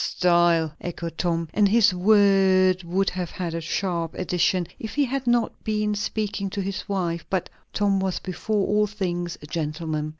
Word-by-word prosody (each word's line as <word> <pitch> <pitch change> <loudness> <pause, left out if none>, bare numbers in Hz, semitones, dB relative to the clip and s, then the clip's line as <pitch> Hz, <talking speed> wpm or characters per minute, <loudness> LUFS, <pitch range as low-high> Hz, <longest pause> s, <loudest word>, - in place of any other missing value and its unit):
"Style!" 170 -3 +2
echoed 170 -1 -5
Tom, 170 -2 0
and 205 -1 +4
his 220 -2 +4
word 190 -1 +4
would 185 +3 0
have 180 -2 -4
had 175 -3 -4
a 165 - -3
sharp 170 0 -2
addition 180 0 +1
if 220 - -6
he 290 -1 +3
had 265 0 -3
not 240 -1 +1
been 210 -1 0
speaking 210 -1 -2
to 200 - -3
his 195 +1 -5
wife; 175 -4 -1
but 190 -2 -2 0.2
Tom 200 -2 +1
was 190 -1 -1
before 195 +2 -2
all 210 +1 +2
things 175 -4 -3
a - - -7
gentleman. 155 0 -3
185 Hz, 170 wpm, -24 LUFS, 170-205 Hz, 0.2 s, and